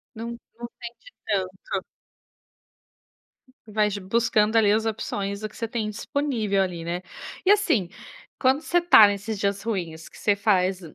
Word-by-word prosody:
Não 230 Hz, +1 st, -5 dB, 0.3 s
não 235 Hz, 0 st, -6 dB
sente 240 Hz, -, -5 dB, 0.8 s
tanto. 190 Hz, -, -1 dB, 1.9 s
Vais 210 Hz, -1 st, 0 dB
buscando 215 Hz, +2 st, +2 dB
ali 210 Hz, -2 st, +5 dB
as 220 Hz, +1 st, +2 dB
opções 200 Hz, -2 st, -3 dB
do 215 Hz, 0 st, -5 dB
que -, -, -16 dB
você 230 Hz, -, -3 dB
tem 220 Hz, -2 st, -2 dB
disponível 220 Hz, -3 st, -1 dB
ali, 175 Hz, -3 st, -2 dB
né. 175 Hz, +1 st, -3 dB, 0.4 s
E 380 Hz, -, +1 dB
assim, 255 Hz, -, +2 dB, 0.5 s
quando 265 Hz, +3 st, +3 dB
você 350 Hz, -, 0 dB
está 340 Hz, -, +8 dB
nesses 205 Hz, +1 st, -3 dB
dias 200 Hz, 0 st, -1 dB
ruins, 170 Hz, -8 st, -4 dB
o -, -, -14 dB
que -, -, -15 dB
você 205 Hz, -1 st, +2 dB
faz 190 Hz, -2 st, +1 dB
210 Hz, 155 wpm, -25 LUFS, 195-230 Hz, 1.9 s, está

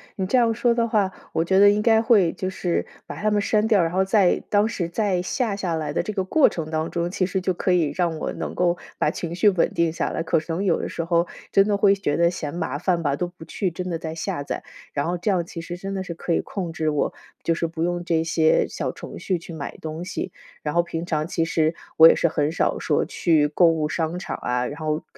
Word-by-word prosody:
你 190 Hz, -, -2 dB
这 230 Hz, +7 st, +2 dB
样 230 Hz, -2 st, +3 dB
说 240 Hz, +1 st, +2 dB
的 235 Hz, 0 st, +1 dB
话， 210 Hz, -4 st, +1 dB, 0.2 s
我 165 Hz, -, +1 dB
觉 190 Hz, +3 st, +3 dB
得 205 Hz, 0 st, +8 dB
应 205 Hz, +1 st, +2 dB
该 225 Hz, 0 st, +4 dB
会 210 Hz, -7 st, +4 dB
就 185 Hz, 0 st, -4 dB
是 180 Hz, -2 st, -1 dB, 0.2 s
把 -, -, -8 dB
它 215 Hz, -, +2 dB
们 210 Hz, -1 st, +2 dB
删 215 Hz, +1 st, +2 dB
掉， 210 Hz, -5 st, +4 dB
然 165 Hz, -, -1 dB
后 190 Hz, +2 st, +2 dB
在 195 Hz, -2 st, +3 dB
当 205 Hz, 0 st, +3 dB
时 180 Hz, -6 st, -2 dB
在 185 Hz, 0 st, 0 dB
下 220 Hz, +4 st, -1 dB
下 185 Hz, -4 st, -2 dB
来 155 Hz, -2 st, -3 dB
的 150 Hz, -, 0 dB
这 210 Hz, +4 st, -5 dB
个 195 Hz, -2 st, -1 dB
过 275 Hz, +10 st, +4 dB
程 160 Hz, -2 st, -4 dB
当 160 Hz, +1 st, -1 dB
中， 170 Hz, 0 st, -2 dB
其 185 Hz, -, 0 dB
实 185 Hz, +1 st, -2 dB
就 185 Hz, 0 st, 0 dB
可 180 Hz, +1 st, 0 dB
以 165 Hz, -5 st, +2 dB
让 170 Hz, -1 st, 0 dB
我 -, -, -3 dB
能 -, -, -5 dB
够 175 Hz, -1 st, +2 dB, 0.2 s
把 -, -, +1 dB
情 170 Hz, -1 st, -5 dB
绪 195 Hz, +4 st, +5 dB
稳 185 Hz, -4 st, +2 dB
定 170 Hz, -1 st, +1 dB
下 165 Hz, -, -2 dB
来， 165 Hz, -, -2 dB
可 165 Hz, -, +2 dB
是 160 Hz, -, -13 dB
能 180 Hz, +4 st, -1 dB
有 185 Hz, -4 st, +2 dB
的 -, -, -3 dB
时 165 Hz, -, -4 dB
候 170 Hz, +1 st, +1 dB, 0.2 s
真 195 Hz, +1 st, +4 dB
的 205 Hz, -, +2 dB
会 200 Hz, 0 st, +5 dB
觉 195 Hz, -7 st, -1 dB
得 170 Hz, 0 st, +3 dB
嫌 155 Hz, -5 st, -5 dB
麻 145 Hz, -5 st, -2 dB
烦 175 Hz, +1 st, 0 dB
吧， 140 Hz, -2 st, 0 dB
都 180 Hz, -, -1 dB
不 175 Hz, -1 st, -13 dB
去 185 Hz, +3 st, -2 dB
真 180 Hz, +2 st, -5 dB
的 165 Hz, -2 st, -2 dB
在 160 Hz, 0 st, -5 dB
下 150 Hz, -3 st, -3 dB
载， -, -, -4 dB, 0.3 s
然 140 Hz, -, -1 dB
后 175 Hz, +1 st, -1 dB
这 175 Hz, +4 st, -2 dB
样 180 Hz, -4 st, +1 dB
其 170 Hz, -, -8 dB
实 170 Hz, +1 st, -6 dB
真 195 Hz, +2 st, -6 dB
的 190 Hz, -1 st, -2 dB
是 180 Hz, -, -6 dB
可 170 Hz, +1 st, -2 dB
以 -, -, +2 dB
控 180 Hz, -4 st, -4 dB
制 160 Hz, -1 st, -1 dB
我 150 Hz, -1 st, 0 dB, 0.3 s
就 165 Hz, -, +2 dB
是 165 Hz, 0 st, -1 dB
不 165 Hz, 0 st, -4 dB
用 175 Hz, 0 st, -1 dB
这 165 Hz, -2 st, +1 dB
些 160 Hz, -1 st, +3 dB
小 -, -, -3 dB
程 -, -, -9 dB
序 185 Hz, -, -1 dB
去 170 Hz, -, -11 dB
买 150 Hz, -3 st, -6 dB
东 160 Hz, +2 st, -5 dB
西。 180 Hz, -, -4 dB, 0.3 s
然 150 Hz, -, -2 dB
后 170 Hz, -, +4 dB
平 170 Hz, -1 st, -5 dB
常 155 Hz, -2 st, -1 dB
其 165 Hz, -1 st, 0 dB
实 160 Hz, 0 st, +1 dB, 0.2 s
我 160 Hz, -, +10 dB
也 -, -, +6 dB
是 -, -, +2 dB
很 150 Hz, 0 st, 0 dB
少 165 Hz, -, 0 dB
说 -, -, +1 dB
去 155 Hz, -4 st, +2 dB
购 175 Hz, +4 st, +4 dB
物 160 Hz, -2 st, +1 dB
商 165 Hz, +2 st, -2 dB
场 -, -, -5 dB
啊， 125 Hz, 0 st, 0 dB
然 145 Hz, +5 st, -6 dB
后 155 Hz, 0 st, -2 dB
175 Hz, 290 characters per minute, -23 LUFS, 160-190 Hz, 0.3 s, 我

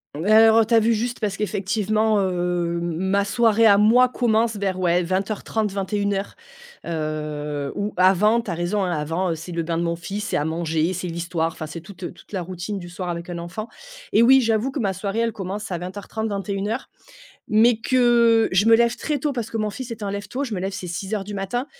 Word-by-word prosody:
Bah, 200 Hz, +8 st, +2 dB
alors, 225 Hz, 0 st, +7 dB
heu, -, -, +2 dB
tu 230 Hz, -, -2 dB
as 225 Hz, -, +7 dB
vu 225 Hz, +1 st, +2 dB
juste 240 Hz, +3 st, -3 dB
parce 205 Hz, -3 st, -2 dB
qu'effectivement, 215 Hz, +1 st, 0 dB
hem, 175 Hz, -1 st, -1 dB, 0.2 s
ma 190 Hz, +2 st, +1 dB
soirée 225 Hz, +1 st, +3 dB
à 200 Hz, -1 st, +6 dB
moi 240 Hz, +4 st, +5 dB
commence 230 Hz, -2 st, +1 dB
vers, 190 Hz, -2 st, -2 dB
ouais, 175 Hz, 0 st, +2 dB
20:30-21:00, 200 Hz, +1 st, -2 dB, 0.5 s
heu, 150 Hz, -3 st, -3 dB
ou 205 Hz, +1 st, -3 dB
avant, 195 Hz, +5 st, +4 dB
tu 220 Hz, -, -9 dB
as 170 Hz, -, -2 dB
raison, 175 Hz, +4 st, -1 dB
hein. 180 Hz, -, -1 dB
Avant, 165 Hz, +4 st, -1 dB
heu, 165 Hz, -, 0 dB
c'est 165 Hz, +3 st, -9 dB
le 170 Hz, 0 st, -2 dB
bain 165 Hz, 0 st, -2 dB
de 170 Hz, -, 0 dB
mon 170 Hz, 0 st, -1 dB
fils, 195 Hz, +5 st, -5 dB
c'est -, -, 0 dB
à 145 Hz, -, -1 dB
manger, 165 Hz, +1 st, -1 dB
c'est 185 Hz, +1 st, -4 dB
l'histoire, 165 Hz, -1 st, -2 dB
enfin, 155 Hz, -, -7 dB
c'est 160 Hz, +2 st, -8 dB
toute, 190 Hz, +1 st, -13 dB
heu, -, -, -5 dB
toute -, -, -19 dB
la 190 Hz, -3 st, -2 dB
routine 185 Hz, +3 st, -5 dB
du 175 Hz, -1 st, -9 dB
soir 180 Hz, 0 st, -5 dB
avec 170 Hz, +1 st, -5 dB
un 175 Hz, -, -4 dB
enfant 175 Hz, +6 st, -6 dB, 0.4 s
et 230 Hz, -, +5 dB
oui, 265 Hz, +2 st, +7 dB
j'avoue 225 Hz, +3 st, +1 dB
que 275 Hz, -, -4 dB
ma 195 Hz, -4 st, 0 dB
soirée, 200 Hz, +4 st, -3 dB
elle 230 Hz, 0 st, +1 dB
commence 200 Hz, 0 st, -5 dB
à 175 Hz, -, -1 dB
20:30-21:00, 200 Hz, +3 st, -4 dB, 0.6 s
mais 220 Hz, +2 st, +4 dB
que 235 Hz, -3 st, +4 dB
je 195 Hz, +4 st, +3 dB
me 225 Hz, -, +8 dB
lève 235 Hz, +1 st, +2 dB
très 300 Hz, -2 st, -1 dB
tôt 285 Hz, +1 st, -1 dB
parce 235 Hz, -3 st, -4 dB
que 225 Hz, -, -3 dB
mon 215 Hz, -1 st, -1 dB
fils 255 Hz, +3 st, -7 dB
est 225 Hz, -2 st, -6 dB
un 200 Hz, -, -2 dB
lève-tôt. 205 Hz, +7 st, -4 dB
Je 235 Hz, -6 st, -4 dB
me 185 Hz, -, -2 dB
lève, 190 Hz, +1 st, -3 dB
c'est 185 Hz, -1 st, -6 dB
6:00 195 Hz, +4 st, -3 dB
du 205 Hz, +1 st, -8 dB
matin, 200 Hz, +7 st, -2 dB
200 Hz, 225 wpm, -23 LUFS, 175-220 Hz, 0.6 s, me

